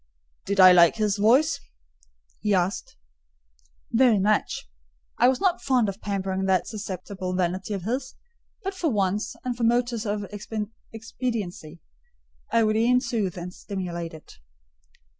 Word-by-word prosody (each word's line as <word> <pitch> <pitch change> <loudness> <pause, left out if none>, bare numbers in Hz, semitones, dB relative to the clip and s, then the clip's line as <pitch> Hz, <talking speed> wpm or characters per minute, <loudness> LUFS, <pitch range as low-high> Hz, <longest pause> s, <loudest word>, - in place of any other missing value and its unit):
"Did 200 0 -2
I 185 -1 +10
like 170 -2 +6
his 210 -2 0
voice?" 255 +10 +4 0.8
he 210 -1 +1
asked. 185 +1 -1 1.0
"Very 235 -2 +5
much." 200 - 0 0.5
I 245 - +6
was 260 0 +2
not 370 -2 +1
fond 255 -5 +2
of 195 +2 -7
pampering 190 -1 -2
that 185 -2 +2
susceptible 185 -3 -5
vanity 185 +3 -1
of 190 - -5
his; 255 +6 -3 0.5
but 390 0 -3
for 360 -4 -1
once, 205 -2 -1
and 250 -1 -1
from 235 -1 +1
motives 240 -1 0
of 205 0 -2 0.7
expediency, 220 -8 -5 0.7
I 230 0 +4
would 215 0 +2
e'en 245 +3 +4
soothe 225 -8 -2
and 180 +1 -6
stimulate 175 -5 -5
it. 155 - -15
210 Hz, 140 wpm, -25 LUFS, 185-235 Hz, 1.0 s, I